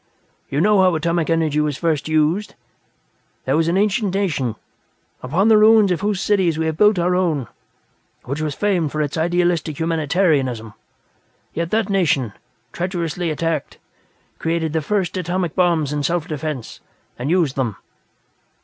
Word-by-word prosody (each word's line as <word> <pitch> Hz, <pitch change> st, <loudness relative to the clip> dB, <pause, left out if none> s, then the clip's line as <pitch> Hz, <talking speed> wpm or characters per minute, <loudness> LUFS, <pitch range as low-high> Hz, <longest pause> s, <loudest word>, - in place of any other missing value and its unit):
You 140 Hz, +2 st, 0 dB
know 205 Hz, +1 st, +4 dB
how 185 Hz, -2 st, +3 dB
atomic 170 Hz, +1 st, 0 dB
energy 160 Hz, -2 st, +1 dB
was 150 Hz, -2 st, 0 dB
first 160 Hz, -4 st, -1 dB
used? 155 Hz, +6 st, +1 dB, 0.9 s
There 135 Hz, -, +1 dB
was 165 Hz, +1 st, +2 dB
an 170 Hz, +2 st, +1 dB
ancient 205 Hz, -1 st, +1 dB
nation, 145 Hz, -, -1 dB, 0.7 s
upon 165 Hz, +11 st, +1 dB
the 220 Hz, -1 st, +6 dB
ruins 215 Hz, -2 st, +6 dB
of 180 Hz, -, -1 dB
whose 205 Hz, -2 st, 0 dB
cities 190 Hz, -6 st, +1 dB
we 160 Hz, -, -1 dB
have 160 Hz, -1 st, -1 dB
built 210 Hz, +3 st, +4 dB
our 180 Hz, +1 st, +1 dB
own, 160 Hz, -8 st, 0 dB, 0.8 s
which 140 Hz, +4 st, -4 dB
was 150 Hz, -2 st, -2 dB
famed 180 Hz, -8 st, 0 dB
for 155 Hz, -, -3 dB
its 145 Hz, -, -4 dB
idealistic 170 Hz, -2 st, 0 dB
humanitarianism. 150 Hz, -, 0 dB, 0.8 s
Yet 170 Hz, +1 st, -2 dB
that 220 Hz, 0 st, +1 dB
nation, 160 Hz, -, +1 dB, 0.4 s
treacherously 175 Hz, -1 st, -2 dB
attacked, 160 Hz, -1 st, -2 dB, 0.6 s
created 165 Hz, -1 st, -1 dB
the 160 Hz, -, 0 dB
first 190 Hz, +2 st, -1 dB
atomic 180 Hz, -1 st, -2 dB
bombs 165 Hz, -5 st, +1 dB
in 145 Hz, -, -1 dB
self 170 Hz, +2 st, -1 dB
defense, 150 Hz, -5 st, -5 dB, 0.4 s
and 130 Hz, +4 st, -3 dB
used 165 Hz, -6 st, +2 dB
them. 120 Hz, -7 st, -1 dB
165 Hz, 150 wpm, -20 LUFS, 150-185 Hz, 0.9 s, the